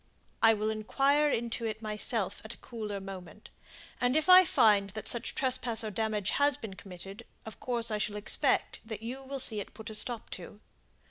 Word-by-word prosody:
"I 225 0 +6
will 215 +1 -1
inquire 275 +7 +2
into 230 -2 -2
it 220 -1 -4
myself 210 -1 -1
at 220 +2 -8
a - - -22
cooler 215 -5 -6
moment; 190 -1 -10 0.5
and 250 +3 +2
if 315 +3 0
I 370 0 +10
find 205 -9 +4
that 210 +1 -6
such 235 - 0
trespass 250 -3 +1
or 215 - -4
damage 215 -1 -1
has 285 -1 +2
been 220 -4 -8
committed, 190 +1 -10 0.2
of 220 - -9
course 235 -2 0
I 210 - -1
shall 210 0 -2
expect 210 0 0
that 220 -1 -7
you 250 +4 -5
will 270 +1 -6
see 235 -5 +2
it 205 - -8
put 220 +1 -8
a - - -7
stop 230 +1 0
to. 205 - -9
220 Hz, 195 wpm, -30 LUFS, 210-245 Hz, 0.5 s, I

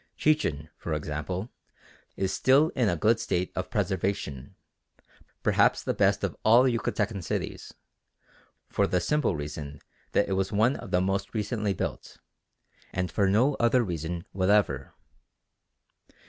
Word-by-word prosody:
Chichen, 145 - +1
for 80 - -3
instance, 75 +8 -4 0.7
is 95 0 -1
still 140 +5 +4
in 120 -8 +1
a 85 - +1
good 110 +7 +2
state 90 -5 -1
of 95 - -3
preservation, 95 - -2 0.9
perhaps - - +3
the - - -1
best - - +2
of - - -1
all 115 +3 +6
Yucatecan 110 -5 -1
cities, - - -4 0.9
for - - +1
the 90 - +1
simple 150 - +1
reason 75 -1 -6 0.3
that 100 - +3
it 95 - -1
was 95 0 0
one 110 +6 +3
of - - -8
the 90 - +2
most 95 +3 -2
recently 105 -2 -1
built, - - -5 0.7
and 90 -1 -2
for 100 -2 +2
no 120 +9 +3
other 120 +1 +3
reason 85 -2 -4
whatever. 95 -8 +1
95 Hz, 135 wpm, -27 LUFS, 85-115 Hz, 0.9 s, all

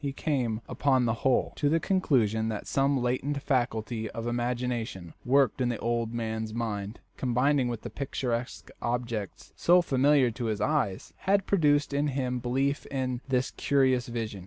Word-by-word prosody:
He 140 -1 -2
came, 125 -7 -1
upon 130 -3 +2
the 115 - +2
whole, 135 -1 +2
to 145 - +2
the 165 +2 +3
conclusion 115 - +1
that 105 -2 -4
some 135 0 +1
latent 130 +4 -1
faculty 115 -4 -1
of 115 - -6
imagination, 120 -6 -2
working 130 -1 +3
in - - +1
the 120 - -1
old 115 0 -1
man's 110 -1 -3
mind, 105 -2 -3 0.2
combining 130 +2 +2
with 120 -2 -4
the - - -6
picturesque 125 -3 -3
objects 120 -4 -3
so 175 +1 +4
familiar 135 -3 +3
to 120 +2 -5
his 110 -2 -1
eyes, 105 -6 -1
had 195 0 +3
produced 145 -6 +2
in 145 +1 +1
him 130 -3 -1
belief 135 +4 -1
in 130 -2 -2
this 130 -1 0
curious 130 -3 +2
vision. 115 -4 -4
125 Hz, 160 wpm, -28 LUFS, 115-140 Hz, 0.2 s, so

